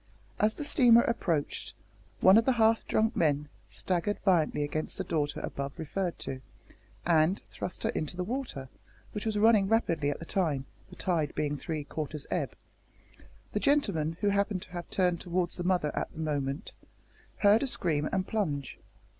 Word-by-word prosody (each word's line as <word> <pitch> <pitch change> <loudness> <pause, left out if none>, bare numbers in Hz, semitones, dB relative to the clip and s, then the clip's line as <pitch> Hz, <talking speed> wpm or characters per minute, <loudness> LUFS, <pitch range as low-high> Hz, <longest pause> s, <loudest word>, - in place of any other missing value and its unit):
As 215 +1 +2
the - - -5
steamer 245 -6 +6
approached, 165 -10 -1 0.5
one 190 +1 +8
of 225 +1 +5
the 260 - +4
half 225 -1 +3
drunk 220 +2 +1
men 150 -2 +1 0.2
staggered 185 +3 -1
violently 165 -6 +3
against 150 +2 -3
the - - -2
daughter 145 -2 -1
above 140 0 -5
referred 175 +3 -3
to, 130 -1 -6 0.6
and 170 +2 +3
thrust 180 - -5
her - - +1
into 155 +3 -3
the 180 - -1
river, 240 - -4 0.4
which 210 +1 -4
was 215 -1 0
running 210 -2 +5
rapidly 165 -9 +1
at 145 - -2
the 165 - -9
time, 155 -8 0 0.2
the - - -12
tide 165 -5 -1
being 150 -1 0
three 155 +1 -4
quarters 150 0 -5
ebb. - - -1 1.0
The - - -1
gentleman, 165 - +1
who 205 - +3
happened 200 -1 0
to - - -15
have 175 -1 -6
turned 180 -3 +1
towards 175 -1 -1
the 175 - -3
mother 175 -5 +1
at - - -2
the - - -11
moment, 145 -2 -2 0.6
heard 205 +2 +5
a 275 - 0
scream 155 - 0
and 190 -1 0
plunge. 155 - -2
175 Hz, 170 wpm, -30 LUFS, 150-205 Hz, 1.0 s, one